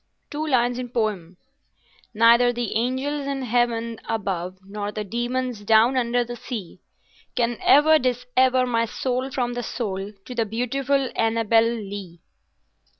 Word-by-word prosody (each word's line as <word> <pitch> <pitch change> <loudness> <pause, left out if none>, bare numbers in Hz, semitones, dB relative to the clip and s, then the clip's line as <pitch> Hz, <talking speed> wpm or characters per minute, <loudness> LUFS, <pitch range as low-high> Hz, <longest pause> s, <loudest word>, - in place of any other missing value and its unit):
"Two 305 +1 -3
lines 245 -3 +2
in 250 -1 -5
Poe— 210 -7 -2 0.8
Neither 235 +2 +6
the 240 -2 -3
angels 265 +5 -1
in 275 -1 -2
Heaven 235 -1 0
above 190 -4 -3
nor 205 +1 -5
the 210 0 -4
demons 240 +3 -2
down 220 +4 +4
under 245 -1 +1
the 240 0 -7
sea, 220 -7 -7 0.5
Can 240 -1 0
ever 310 +2 +6
dissever 255 0 +2
my 230 -2 +1
soul 255 +3 -2
from 245 -2 -2
the 245 - -3
soul 200 -5 -4
of 210 +4 -12
the 230 - +2
beautiful 260 +4 -1
Annabel 225 0 +3
Lee. 200 -6 -5
240 Hz, 140 wpm, -23 LUFS, 220-255 Hz, 0.8 s, Neither